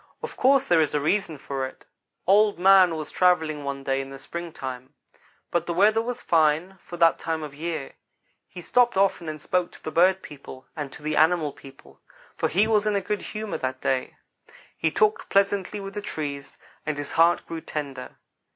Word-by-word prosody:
Of - - -6
course 270 +1 +4
there 170 -7 +4
is 150 - 0
a - - +2
reason 160 +1 0
for 135 0 -4
it. 130 - -7 0.4
"Old 205 +2 +4
man 185 -2 +6
was 155 -1 -6
travelling 160 -5 +2
one 140 -1 -4
day 135 0 0
in 135 - -8
the 135 - -9
springtime; 135 -5 -7 0.6
but 170 -1 0
the 170 - -2
weather 215 +4 +4
was 245 +1 -4
fine 165 +3 +2
for 175 - -9
that 165 -4 +4
time 160 -1 -3
of 150 -2 -7
year. 160 -1 -5 0.5
He 180 - -10
stopped 240 +3 +2
often 190 -4 +1
and 155 0 -6
spoke 180 +3 -1
to - - -16
the 155 - -4
bird 185 +3 +3
people 135 -3 -11
and 145 -3 -5
to 145 - -13
the 155 0 -1
animal 155 -1 +3
people, 135 0 -16 0.3
for - - 0
he 195 +6 +3
was 215 -1 +2
in 205 -1 +2
good 210 0 -3
humor 215 -1 -5
that 130 0 -3
day. 130 -1 -1 0.6
He 160 - 0
talked 215 +6 +1
pleasantly 200 0 +1
with 195 0 -7
the 205 - -4
trees, 145 -7 -5 0.3
and 155 -1 -3
his 145 0 -4
heart 170 +1 +3
grew 165 -1 -6
tender. 140 -5 -6
165 Hz, 195 wpm, -25 LUFS, 145-195 Hz, 0.6 s, man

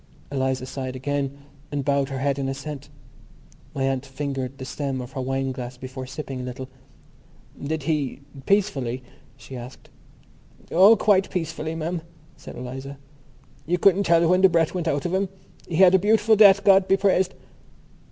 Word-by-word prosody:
Eliza 130 -2 -1
sighed 130 -1 -5
again 140 +1 -2 0.3
and 145 -2 -3
bowed 140 -1 +1
her 135 - -4
head 140 +1 0
in 135 -1 -1
assent. 140 +1 -6 0.9
My 135 - -1
aunt 135 -1 0
fingered 135 -1 -5
the 130 - -7
stem 135 -1 -3
of 125 0 -7
her 135 -1 -4
wine 135 +1 -1
glass 125 -1 -7
before 130 0 -7
sipping 135 -1 -6
a - - -6
little. 130 +1 -7 0.9
"Did 155 +1 -3
he... 145 -3 -2 0.3
peacefully?" 135 - 0 0.3
she 135 - -11
asked. 125 +1 -10 0.8
"Oh, 195 +6 +7
quite 200 -3 +3
peacefully, 165 -2 -3
ma'am," 165 +1 -3 0.3
said - - -11
Eliza. 130 +3 -7 0.7
"You 175 +2 +1
couldn't 195 +2 +4
tell 170 0 +4
when 180 +2 +3
the 190 - +7
breath 165 -2 +1
went 175 -2 -3
out 145 -1 -1
of 175 - -2
him. 190 0 0 0.4
He 170 - -4
had 185 +1 +6
a 190 - +6
beautiful 220 +2 +4
death, 200 -2 +7
God 195 -1 +5
be 195 - +4
praised." 190 -2 +2
140 Hz, 170 wpm, -24 LUFS, 130-180 Hz, 0.9 s, Oh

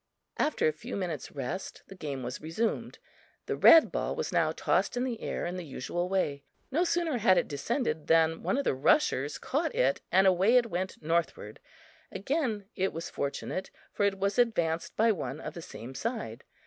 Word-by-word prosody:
After 300 - +2
a - - +3
few 230 +11 -7
minutes' 175 -7 -4
rest, 140 +8 -5
the - - -12
game 145 -8 -5
was 125 +2 -5
resumed. 165 +9 -2 0.5
The - - -2
red 325 - +7
ball - - -2
was 475 -1 -3
now - - +2
tossed - - 0
in 245 - +1
the 245 -3 -3
air - - -3
in 180 +1 -3
the 180 - -5
usual 165 +5 -3
way. 150 -7 -1 0.3
No 320 +6 +2
sooner 335 -7 0
had 190 -4 +5
it - - +2
descended 155 - -2
than 165 0 +3
one 190 +8 0
of 280 - 0
the - - +1
rushers 145 - +2
caught 305 +3 -2
it 135 +2 +2
and 190 +2 +5
away 190 +6 +5
it 235 -2 +1
went 185 -1 -3
northward; 165 -9 -1 0.5
again 230 - -1
it 190 -1 0
was 165 +1 -6
fortunate, 140 +6 -3 0.2
for - - -1
it 200 -1 +2
was 200 +4 0
advanced 170 -9 +1
by 225 +1 +4
one 150 -7 -4
of - - -6
the 170 - -8
same 125 -4 -9
side. 215 - -4
185 Hz, 190 wpm, -29 LUFS, 155-230 Hz, 0.5 s, red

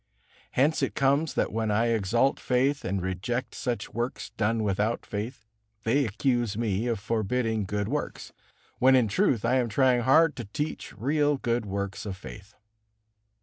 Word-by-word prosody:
Hence 145 +5 +2
it 135 - -1
comes 140 +3 +2
that - - 0
when 110 0 -1
I 115 +3 +2
exalt 115 +5 +2
faith 135 +3 +1
and 95 0 -2
reject 100 +7 -3
such 120 -5 -3
works 120 +3 -3
done 110 +1 0
without 105 +3 0
faith, 110 +2 -5 0.4
they 135 +5 +2
accuse 120 -1 0
me 110 0 0
of 115 -4 -1
forbidding 110 0 -1
good 105 +1 -2
works, - - -4 0.5
when 130 +1 +6
in 125 -3 +4
truth 120 - +1
I 125 +3 +3
am 120 -2 +1
trying 125 +2 +3
hard 155 +6 +4
to 120 - -5
teach 145 +3 -5
real 145 +5 +1
good 120 -4 -1
works 100 +1 -4
of 95 -2 -5
faith. 100 +1 -11
115 Hz, 160 wpm, -27 LUFS, 105-130 Hz, 0.5 s, when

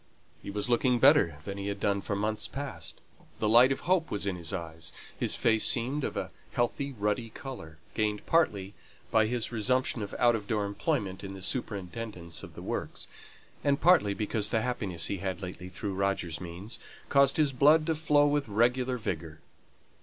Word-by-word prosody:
He - - -8
was 105 +2 -2
looking 125 +1 +3
better 130 - +5
than 100 0 -5
he 100 - -4
had 100 0 -3
done 100 0 +1
for 100 - -2
months 110 +2 -1
past; 130 -13 -6 0.4
the 110 - 0
light 120 +4 +7
of 135 - -1
hope 180 -2 +1
was 100 0 -3
in 95 -2 -1
his 85 -2 -7
eyes, 80 -3 -6 0.2
his - - +1
face 110 -1 +3
seemed 130 +5 +1
of - - -3
a - - -3 0.2
healthy 140 +4 0
ruddy 105 +1 -1
colour, 110 - -9 0.2
gained 105 -2 -1
partly 105 - +1 0.4
by 110 -1 +4
his 120 0 -1
resumption 125 +1 +1
of 100 - -5
outdoor 110 -3 +2
employment 100 - -2
in 95 0 -6
the 95 - -9
superintendence 95 -4 -4
of - - -11
the - - -8
works, - - -4 0.6
and 140 0 +2
partly 160 - +5
because 105 0 -1
the 110 -2 +1
happiness 100 -10 -2
he 100 - -2
had 95 +1 -3
lately 90 0 -6
had 90 - -13
through 100 -3 -3
Roger's 95 -4 -1
means, 90 +5 -7 0.3
caused 140 -1 +4
his 150 -3 +3
blood 150 +4 +5
to 165 - +1
flow 150 -2 +3
with 145 -2 +1
regular 125 +4 +2
vigour. 80 -7 -4
110 Hz, 185 wpm, -29 LUFS, 100-130 Hz, 0.6 s, light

